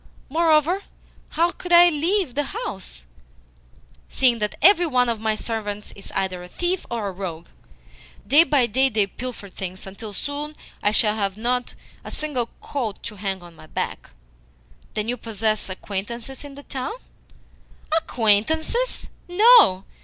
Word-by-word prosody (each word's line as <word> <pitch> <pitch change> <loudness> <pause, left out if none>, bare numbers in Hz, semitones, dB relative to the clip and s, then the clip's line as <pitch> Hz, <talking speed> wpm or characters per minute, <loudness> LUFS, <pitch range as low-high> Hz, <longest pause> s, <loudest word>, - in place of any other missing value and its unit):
Moreover, 325 +4 +3 0.5
how 340 +2 +3
could 360 - -9
I 350 0 +9
leave 335 0 0
the 290 - -2
house, 175 - -7 1.0
seeing 245 -3 +3
that 210 -1 -1
every 355 +1 +6
one 250 -4 +2
of 230 -2 -1
my 220 -1 +1
servants 210 -2 -5
is 200 - -10
either 185 -2 -1
a 180 - -9
thief 350 - -2
or 230 -4 -2
a - - -3
rogue? 175 -3 -6 0.8
Day 300 +4 +7
by 290 -6 +3
day 260 +4 +2
they 215 -4 +2
pilfer 240 +1 -7
things, 185 -1 -7
until 200 +3 -8
soon 290 +8 -4 0.3
I 205 - +3
shall 210 0 +4
have 200 -2 -1
not 245 +2 -1 0.3
a - - -7
single 260 -6 -2
coat 235 -8 -4
to 210 -2 -7
hang 190 -2 -3
on 170 -1 -13
my 155 - -14
back." - - -4 0.9
"Then 215 0 -1
you 245 +1 0
possess 215 -2 -1
acquaintances 225 +8 -5
in 285 -1 -10
the 285 - -11
town?" 265 +9 -4 1.0
"Acquaintances? 315 - +1 0.2
No. 395 - +6
235 Hz, 150 wpm, -23 LUFS, 205-305 Hz, 1.0 s, I